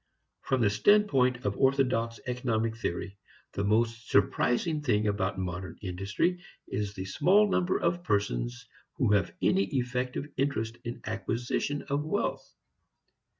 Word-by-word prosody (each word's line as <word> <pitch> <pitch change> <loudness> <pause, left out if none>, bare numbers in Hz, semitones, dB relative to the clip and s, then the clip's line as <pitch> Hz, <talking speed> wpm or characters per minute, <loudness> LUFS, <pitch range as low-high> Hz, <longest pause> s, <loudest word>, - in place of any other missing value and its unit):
From 130 -2 0
the 105 -3 +3
standpoint 130 - +3
of 100 0 0
orthodox 125 -4 +2
economic 115 -3 -1
theory, 100 -2 -4 0.3
the 100 - -2
most 115 +2 +1
surprising 125 - +2
thing 110 -7 +1
about 100 -2 0
modern 90 -1 -4
industry 100 - -1 0.3
is 100 0 -3
the 95 -1 -5
small 195 - +4
number 185 -2 +1
of 170 +1 0
persons - - -1 0.3
who - - +1
have 100 -3 +2
any 95 +1 +3
effective 125 +4 -2
interest 120 -4 -1
in 120 - -6
acquisition 120 +5 -2
of 140 +1 -1
wealth. 160 +7 -2
115 Hz, 130 wpm, -29 LUFS, 100-135 Hz, 0.3 s, small